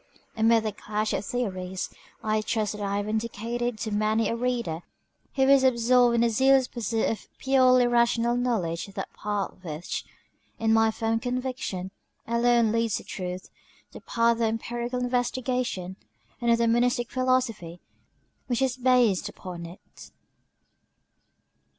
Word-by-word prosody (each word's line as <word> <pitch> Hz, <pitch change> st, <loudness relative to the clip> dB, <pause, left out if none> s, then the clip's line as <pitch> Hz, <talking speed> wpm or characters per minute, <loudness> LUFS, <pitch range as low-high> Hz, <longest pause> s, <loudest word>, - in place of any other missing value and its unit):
Amid 225 Hz, 0 st, +4 dB
the 215 Hz, -, -1 dB
clash 210 Hz, +1 st, -3 dB
of -, -, -1 dB
theories, 190 Hz, -6 st, -3 dB, 0.4 s
I 215 Hz, 0 st, +1 dB
trust 215 Hz, -1 st, -1 dB
that 210 Hz, -, -7 dB
I 200 Hz, 0 st, -1 dB
have 205 Hz, 0 st, -2 dB
indicated 230 Hz, +2 st, -2 dB
to 220 Hz, -, -3 dB
many 215 Hz, +1 st, +1 dB
a 230 Hz, -, -1 dB
reader 235 Hz, -9 st, -1 dB, 0.6 s
who 265 Hz, -, +3 dB
is 270 Hz, 0 st, +5 dB
absorbed 245 Hz, -1 st, +4 dB
in 230 Hz, -, +3 dB
the 235 Hz, -, +3 dB
zealous 265 Hz, +3 st, +4 dB
pursuit 225 Hz, -1 st, -1 dB
of 225 Hz, -, -3 dB
purely 255 Hz, -2 st, +4 dB
rational 235 Hz, 0 st, +2 dB
knowledge 210 Hz, -10 st, -1 dB
that 195 Hz, 0 st, -7 dB
path 205 Hz, -2 st, -4 dB
which, 160 Hz, 0 st, -5 dB, 0.5 s
it -, -, -10 dB
is 220 Hz, -, +4 dB
my 225 Hz, 0 st, +4 dB
firm 225 Hz, +1 st, -1 dB
conviction, 245 Hz, -7 st, -3 dB, 0.3 s
alone 235 Hz, -1 st, +3 dB
leads 230 Hz, -1 st, +1 dB
to -, -, -4 dB
the -, -, -19 dB
truth 180 Hz, -1 st, -5 dB, 0.4 s
the -, -, -11 dB
path 230 Hz, 0 st, +2 dB
of -, -, -4 dB
empirical 235 Hz, +2 st, -2 dB
investigation 245 Hz, -6 st, -1 dB, 0.4 s
and 235 Hz, -, +1 dB
of 230 Hz, -, +5 dB
the 235 Hz, 0 st, +2 dB
Monistic 240 Hz, +1 st, +1 dB
Philosophy 255 Hz, -10 st, 0 dB, 0.7 s
which 245 Hz, +1 st, 0 dB
is 260 Hz, -1 st, 0 dB
based 250 Hz, -6 st, +3 dB
upon 175 Hz, -2 st, -8 dB
it. 175 Hz, +3 st, -14 dB
230 Hz, 150 wpm, -26 LUFS, 210-245 Hz, 0.7 s, is